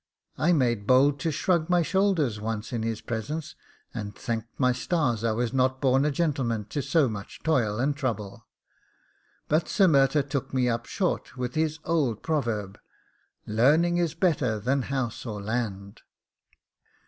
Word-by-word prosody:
I 165 - +3
made 120 -9 +1
bold 140 +2 +4
to 160 - -1
shrug 170 +2 +1
my 175 -1 +3
shoulders 165 - +1
once 110 +1 -4
in 115 - -1
his 115 -1 -3
presence, 145 +8 -4 0.4
and 105 -3 -5
thanked 115 -2 -5
my 125 -2 +4
stars 125 - 0
I 115 - +2
was 120 +2 -1
not 130 0 +1
born 135 +1 +3
a - - +3
gentleman 135 -8 -1
to 145 - -2
so 140 +2 +2
much 100 -3 -7
toil 120 -10 +1
and 140 +4 0
trouble; 110 -8 -4 1.0
but 155 +2 +1
Sir 200 - +4
Murtagh 140 -2 +3
took 135 -1 -3
me 125 -1 +2
up 115 -1 -1
short 180 -9 -2
with 125 -1 -3
his 155 0 0
old 145 -10 0
proverb, 115 -10 -2 0.7
'learning 150 +11 +3
is 170 -3 0
better 140 - +1
than 130 +6 0
house 130 -4 -2
or 110 -4 -5
land. 100 -2 -4
130 Hz, 160 wpm, -26 LUFS, 115-155 Hz, 1.0 s, bold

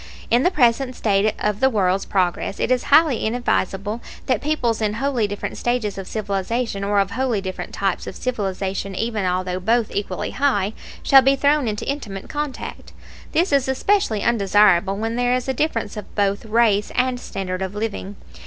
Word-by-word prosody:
In 240 +2 +5
the 360 - +4
present 255 -4 +2
state 205 -1 +1
of 210 -1 -1
the 265 - +4
world's 195 -4 +1
progress 185 +1 -1
it - - 0
is 250 -1 +1
highly 290 -4 +4
inadvisable 220 -2 -1 0.2
that 255 -5 +1
peoples 250 -7 0
in 210 -1 +1
wholly 245 -2 0
different 205 0 -5
stages 240 -4 -1
of 195 -1 -7
civilization, 205 +1 -2
or 200 0 +2
of 195 0 0
wholly 245 -1 0
different 190 -1 -6
types 195 -2 -2
of - - -6
civilization 195 -4 -3
even 220 -1 -1
although 180 0 -1
both 225 +4 +1
equally 195 -2 -3
high, 220 -8 +1 0.3
shall 270 -1 +7
be 270 +1 +4
thrown 285 -1 +2
into 210 -1 -3
intimate 215 -9 -5
contact. 295 -3 -5 0.4
This 345 +2 +2
is 275 -2 +2
especially 265 - +1
undesirable 200 -4 +3
when 225 +2 -2
there 245 0 +2
is 255 0 -3
a 265 - 0
difference 240 -7 -1
of 210 - -9
both 200 +1 0
race 215 -2 +2
and 250 0 +1
standard 190 -4 -5
of 190 +1 -4
living. 210 -2 -4
220 Hz, 175 wpm, -21 LUFS, 195-255 Hz, 0.4 s, shall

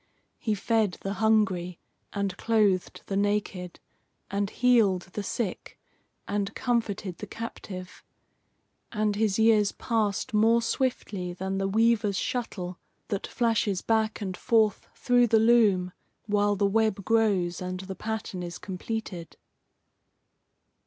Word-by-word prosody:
He 215 -2 0
fed 215 -1 +1
the 195 - -3
hungry, 190 -6 +2 0.3
and 200 -2 -2
clothed 210 -5 +1
the 195 - -3
naked, 200 -3 -1 0.5
and 200 0 0
healed 220 -7 +3
the 210 - -3
sick, 200 -1 -4 0.5
and 205 +1 -2
comforted 210 -7 -1
the - - -6
captive; 185 -5 -8 0.9
and 210 -1 0
his 210 -2 +1
years 220 -2 +4
passed 220 -4 -1
more 225 +2 +5
swiftly 210 -8 -2
than 190 +2 -3
the 195 - 0
weaver's 215 -1 +2
shuttle 185 -8 -3 0.3
that 200 - -2
flashes 225 -5 0
back 220 -1 +1
and 190 -2 -3
forth 220 -2 +2
through 245 -1 +3
the 225 - +4
loom 215 -5 +4 0.3
while 205 -1 +2
the 200 +1 +1
web 210 -1 +1
grows 200 -7 +2
and 185 0 -4
the 190 0 -6
pattern 220 -3 -4
is 175 -1 -6
completed. 190 -2 -6
205 Hz, 125 wpm, -27 LUFS, 190-225 Hz, 0.9 s, more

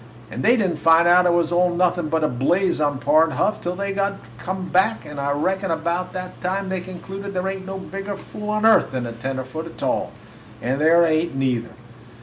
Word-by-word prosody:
And 125 - -5
they 240 +4 +5
did 205 -5 +2
n't - - -5
find 165 +1 +5
out 180 +1 +6
it - - +4
was 170 -1 +1
all 180 +1 +3
nothin' 175 -2 +1
but 160 0 0
a - - +3
blaze 160 +8 +1
on 145 -2 +1
Pard 160 +4 +3
Huff 215 - 0
till 175 - -2
after - - -1
they 200 0 -2
'd 200 0 -1 0.2
come 185 +4 -4
back. 205 +5 +2
I 140 -1 -4
reckon 190 +7 -1
about 170 +2 -1
that 185 0 -7
time 190 +2 -2
they 190 -1 -2
concluded 195 +2 -8
there 180 +1 -1
ain't 190 -1 -5
no 195 0 -5
bigger 195 +1 -6
fool 210 +2 -8
on 215 +1 0
earth 225 - +5
than 130 -2 -3
a 120 - -5
tenderfoot, 130 +6 -5
a - - -7
tall. - - -2 0.5
And 130 +4 -2
there 170 +2 +5
ain't, 160 -1 0
neither. 125 -3 -1
175 Hz, 220 wpm, -22 LUFS, 155-190 Hz, 0.5 s, out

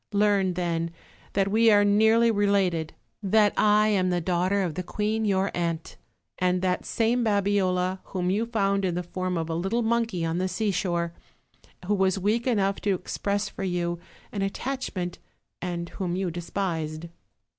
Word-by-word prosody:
Learn, 200 -3 +2
then, 170 -2 -1 0.4
that 195 0 +1
we 225 +2 +4
are 205 -1 +5
nearly 220 +3 +4
related; 195 -6 +1 0.3
that 210 +1 +3
I 210 0 +4
am 185 -3 +2
the 180 -1 +1
daughter 185 +3 +1
of 175 -4 -2
the 185 - -3
queen 215 +4 -1
your 195 -1 +1
aunt; 170 -2 -2 0.4
and 180 0 +1
that 180 -1 0
same 235 +2 +1
Babiola, 190 -3 +1
whom 180 -1 -2
you 220 +4 0
found 200 -4 +1
in 180 -2 0
the 180 - -2
form 185 +1 -3
of 165 -1 -2
a 165 - -3
little 195 +8 0
monkey 225 -6 0
on 165 +2 -1
the 185 - 0
seashore; 180 -3 -1 0.7
who 205 - +1
was 190 -1 +2
weak 215 +6 0
enough 200 -5 +1
to 200 -2 +1
express 200 +3 -2
for 200 - -7
you 175 -2 -1 0.3
an 200 - -3
attachment; 195 -4 -3 0.4
and 170 -1 -3
whom 180 -3 -3
you 185 -2 -1
despised." 165 -2 -3
190 Hz, 165 wpm, -26 LUFS, 175-210 Hz, 0.7 s, are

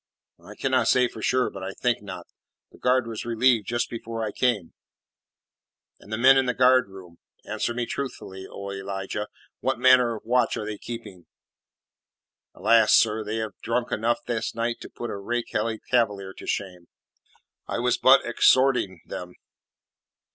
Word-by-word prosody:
"I - - -12
cannot - - +1
say 125 -1 +4
for 110 - -10
sure, 130 +3 +1
but 95 - -9
I 95 +1 -5
think 120 -3 0
not. 95 -4 -8 0.5
The - - -18
guard 125 0 +2
was 115 -2 -5
relieved 120 -1 +2
just 120 0 -1
before 115 -1 -5
I 105 - -3
came." 110 -10 0 1.3
"And 105 - -16
the 110 - -1
men 130 +3 +6
in 130 - 0
the 125 - 0
guardroom 100 -9 +2 0.3
answer - - -2
me 120 -1 -1
truthfully, 95 -8 -6
O 100 0 -7
Elijah 100 +1 -4 0.3
what 130 +3 -1
manner 125 -2 +5
of 110 - -11
watch 125 0 +2
are 105 - -4
they 105 -1 -5
keeping?" 115 -7 -9 1.3
"Alas, 110 +3 +5
sir, 110 -1 +3
they 105 +1 -4
have 110 -1 -3
drunk 120 +1 -1
enough 115 +2 0
this 115 -2 -3
night 115 0 -1
to - - -9
put 120 - -6
a - - -4
rakehelly 115 +1 -2
Cavalier 105 -6 +1
to - - -11
shame. 90 -3 -4 0.8
I - - -3
was - - +1
but - - +6
exhorting 130 -7 +3
them." 90 0 -8
115 Hz, 160 wpm, -25 LUFS, 100-120 Hz, 1.3 s, men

